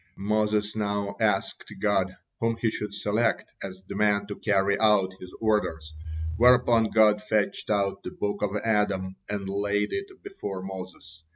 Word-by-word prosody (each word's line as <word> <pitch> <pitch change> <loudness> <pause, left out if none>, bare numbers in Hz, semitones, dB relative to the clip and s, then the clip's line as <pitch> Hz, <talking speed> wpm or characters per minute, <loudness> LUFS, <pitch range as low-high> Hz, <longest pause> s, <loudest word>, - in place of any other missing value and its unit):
Moses 105 +1 0
now 100 -1 -1
asked - - 0
God 95 -3 +1 0.2
whom 115 0 0
he 115 -1 +1
should 105 -1 -4
select 105 +3 0
as 95 -1 -7
the - - -6
man 100 -1 +2
to 100 0 -6
carry 100 -1 +2
out 105 -4 +4
his 90 - -10
orders, 95 -8 0 0.4
whereupon 120 -2 +5
God 105 -1 +4
fetched 105 -1 -1
out 100 -2 +1
the - - -5
book 100 0 -3
of 105 0 -1
Adam 100 -4 +1
and 100 -1 -3
laid 100 +1 0
it 395 0 -2 0.2
before 100 - -6
Moses. 90 -4 -9
105 Hz, 155 wpm, -27 LUFS, 95-110 Hz, 0.4 s, whereupon